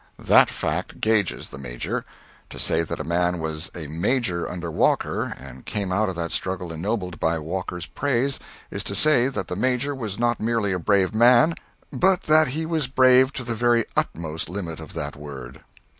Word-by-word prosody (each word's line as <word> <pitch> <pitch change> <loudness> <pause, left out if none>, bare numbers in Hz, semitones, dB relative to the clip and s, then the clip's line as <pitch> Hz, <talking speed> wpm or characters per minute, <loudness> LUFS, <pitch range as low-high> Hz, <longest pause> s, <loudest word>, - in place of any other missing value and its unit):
That - - +5
fact - - -3
gauges 110 -4 +1
the - - -9
Major. - - -4 0.4
To - - -9
say 80 - +2
that 85 - -4
a - - -2
man 90 +1 +1
was 80 0 -3
a 85 - -6
Major 85 - -1
under 85 -2 -5
Walker, - - +1
and 65 0 -11
came 100 -3 -3
out 105 +2 +1
of 95 - -4
that 85 0 -3
struggle 90 -2 -3
ennobled 90 +1 -3
by 80 +1 +1
Walker's 90 +1 -4
praise, 135 - 0 0.3
is - - -4
to - - -3
say 150 -5 +4
that 115 -9 -3
the 90 - -4
Major 130 +6 0
was 110 -7 -5
not 120 0 +1
merely 110 -2 0
a 90 - -1
brave 95 +2 +2
man 120 +7 +6 0.4
but 190 0 +3
that 155 0 +4
he 155 +5 -2
was 160 -4 -1
brave 130 0 +5
to 125 - -5
the 120 -1 -3
very 120 0 +2
utmost 80 0 -2
limit 85 -4 -5
of 80 -2 -10
that - - -4
word. 70 -4 -9
100 Hz, 190 wpm, -24 LUFS, 85-125 Hz, 0.4 s, man